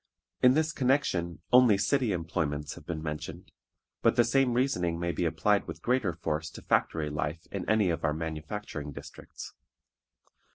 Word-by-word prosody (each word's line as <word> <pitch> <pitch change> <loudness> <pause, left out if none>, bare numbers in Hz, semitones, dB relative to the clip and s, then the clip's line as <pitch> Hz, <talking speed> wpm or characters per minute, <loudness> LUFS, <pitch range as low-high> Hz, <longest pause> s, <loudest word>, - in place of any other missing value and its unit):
In 125 0 +6
this 155 0 +1
connection 95 - 0
only 125 -5 +7
city 125 +2 +1
employments 80 -4 -2
have - - -13
been 80 -2 -4
mentioned, 75 -1 -6 0.5
but - - +3
the 120 - +5
same 125 +1 +2
reasoning 90 -11 +1
may 85 0 -1
be 85 - -1
applied 100 +5 +1
with - - -8
greater 125 -6 +1
force 80 -1 -2
to - - -10
factory 75 -2 +1
life 75 +3 -3
in 100 -2 -4
any 105 -5 +3
of 85 - -3
our 75 - +2
manufacturing 80 -1 -5
districts. - - -10
85 Hz, 160 wpm, -29 LUFS, 80-120 Hz, 0.5 s, only